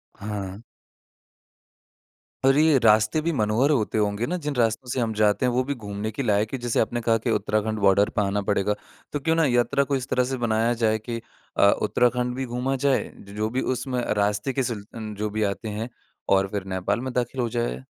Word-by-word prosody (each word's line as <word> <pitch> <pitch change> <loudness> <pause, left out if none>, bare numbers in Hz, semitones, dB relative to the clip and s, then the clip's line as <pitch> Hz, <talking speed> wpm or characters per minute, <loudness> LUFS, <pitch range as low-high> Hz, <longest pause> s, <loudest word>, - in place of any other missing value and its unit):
हाँ। 100 -1 -5 1.8
और 135 +1 +5
ये 155 -2 +5
रास्ते 110 +5 +4
भी 170 +2 0
मनोहर 110 +4 +2
होते 110 -5 +1
होंगे 105 +2 0
ना 180 +2 -1
जिन 145 -2 -1
रास्तों 120 +1 0
से 130 - -1
हम 115 -2 0
जाते 105 +3 +2
हैं 125 - +2
वो 130 +1 +2
भी 140 +2 -2
घूमने 105 -1 -5
के 135 +6 -3
लायक 105 +1 +1
है। 130 - -2
जैसे 120 -1 0
आपने 120 +2 0
कहा 115 0 +2
कि 115 +1 -2
उत्तराखंड 110 +1 0
बॉर्डर 100 +1 +4
पे - - -1
आना 100 +1 0
पड़ेगा, 105 +1 +2 0.4
तो 145 - 0
क्यों 160 +3 +1
ना 165 -2 +3
यात्रा 120 +2 +2
को 140 0 -1
इस 130 0 -3
तरह 125 - +2
से 130 - -1
बनाया 115 +1 +2
जाए 110 0 +3
कि 115 +1 -5 0.4
अ, 100 - +7
उत्तराखंड 125 +3 +1
भी 135 0 -2
घूमा 125 +3 -1
जाए, 135 0 +2 0.2
ज 100 +1 -12
जो 110 +1 0
भी 130 +3 -1
उसमें 130 0 -2 0.2
रास्ते 105 +5 0
के 135 - 0
सिल 110 -4 -4
उन 110 -2 -5
जो 105 +1 -2
भी 110 +1 -1
आते 100 +2 -2
हैं 110 +3 -4 0.5
और 95 0 +2
फिर 100 -2 -2
नेपाल 100 +5 -1
में 130 0 -4
दाखिल 125 +1 -1
हो 120 - 0
जाए। 65 - -2
115 Hz, 215 wpm, -25 LUFS, 105-125 Hz, 1.8 s, अ